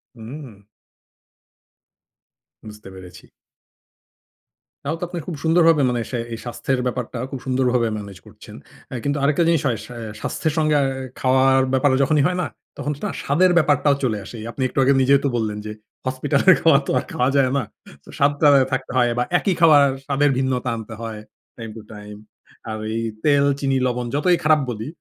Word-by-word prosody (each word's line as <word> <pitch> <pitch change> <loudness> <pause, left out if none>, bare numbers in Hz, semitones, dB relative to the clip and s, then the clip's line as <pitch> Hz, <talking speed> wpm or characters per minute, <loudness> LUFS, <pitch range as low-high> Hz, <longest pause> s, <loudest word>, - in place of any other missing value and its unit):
হুম। 120 0 -10 2.1
বুঝতে 105 -2 -11
পেরেছি। 90 -1 -13 1.6
তাও 150 +3 -2
তো, - - -6
আপনি 175 0 -6
খুব 175 - -4
সুন্দরভাবে 165 -2 +4
মানে 120 -1 -1
সে 125 - -2 0.2
এই 115 - -4
স্বাস্থ্যের 125 +2 -2
ব্যাপারটা, 125 0 -4
খুব 135 - -5
সুন্দরভাবে 125 -2 +1
ম্যানেজ 100 -2 -9
করছেন। - - -14 0.3
অ্যা 130 - -5
কিন্তু 145 +1 -1
আরেকটা 150 +4 +2
জিনিস 165 -3 +2
হয়, 120 -3 0
সা 125 - -11 0.3
স্বাস্থ্যের 160 - -2
সঙ্গে 155 -1 +2
আ - - +2 0.4
খাওয়ার 130 +1 +3
ব্যাপারে 130 0 +3
যখনই 145 +1 +2
হয় 180 0 -2
না, 165 - -2 0.3
তখন 145 - -3
না - - -1
স্বাদের 180 +6 +3
ব্যাপারটাও 145 -3 +3
চলে 115 -5 0
আসে। 110 - -10
এই - - -8
আপনি 135 - -7
একটু 130 - -3
আগে 140 +1 +4
নিজেই 140 +1 +4
তো - - +2
বললেন 110 -2 -2
যে, 105 - -5 0.3
হসপিটালের 140 +7 +3
খাবার 150 -3 +4
তো - - -1
আর - - -7
খাওয়া 125 +1 +1
যায় 135 -2 +3
না। 135 - 0 0.4
তো - - -19
স্বাদটা 145 +1 +3 0.2
থাকতে 130 - -3
হয়, 120 -1 +3
বা - - +2
একই 195 - 0
খাবার, 155 -4 +7 0.2
স্বাদের 145 +1 +2
ভিন্নতা 130 -1 -1
আনতে 110 0 -8
হয়, 110 -2 -6 0.4
টাইম 115 -2 -7
টু 110 - -8
টাইম। 105 0 -10 0.5
আর 110 - -4 0.2
এই 115 - -1 0.2
তেল, 145 -1 +4
চিনি, 135 -1 0
লবণ 125 0 -2
যতই 175 +4 +2
খারাপ 155 0 +4
বলি, 110 0 -5
135 Hz, 180 wpm, -21 LUFS, 120-150 Hz, 2.1 s, খাবার